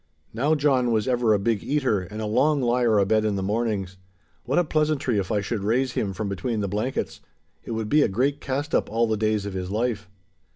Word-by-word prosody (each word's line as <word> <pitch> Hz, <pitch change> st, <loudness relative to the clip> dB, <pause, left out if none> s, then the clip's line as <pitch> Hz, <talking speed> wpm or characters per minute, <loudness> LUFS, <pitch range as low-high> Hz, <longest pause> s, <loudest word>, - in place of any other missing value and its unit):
Now 140 Hz, +8 st, +2 dB
John 135 Hz, -4 st, +2 dB
was 110 Hz, 0 st, +1 dB
ever 120 Hz, -3 st, +2 dB
a 105 Hz, -, +5 dB
big 105 Hz, +1 st, -1 dB
eater 135 Hz, -8 st, +1 dB
and 100 Hz, +4 st, -7 dB
a -, -, -2 dB
long 140 Hz, +8 st, +2 dB
lier 120 Hz, -3 st, +2 dB
abed 110 Hz, +2 st, +3 dB
in 105 Hz, -2 st, 0 dB
the 95 Hz, -, -2 dB
mornings. 100 Hz, -3 st, -2 dB, 0.5 s
What 135 Hz, -, 0 dB
a 175 Hz, -, +5 dB
pleasantry 150 Hz, -7 st, 0 dB
if 95 Hz, +1 st, -3 dB
I 105 Hz, -2 st, +1 dB
should 100 Hz, 0 st, -3 dB
raise 125 Hz, +5 st, +1 dB
him 105 Hz, -4 st, -2 dB
from 105 Hz, +2 st, -4 dB
between 105 Hz, +4 st, -2 dB
the 100 Hz, -, -1 dB
blankets! 105 Hz, +7 st, -3 dB, 0.4 s
It -, -, -5 dB
would 110 Hz, -1 st, -2 dB
be 150 Hz, +6 st, +4 dB
a -, -, +4 dB
great 135 Hz, +8 st, 0 dB
cast 140 Hz, +3 st, -3 dB
up -, -, +1 dB
all 115 Hz, +2 st, +1 dB
the 110 Hz, -1 st, 0 dB
days 110 Hz, -1 st, 0 dB
of 100 Hz, -, -5 dB
his 90 Hz, -1 st, -4 dB
life. 110 Hz, -2 st, -2 dB
110 Hz, 225 wpm, -24 LUFS, 105-130 Hz, 0.5 s, a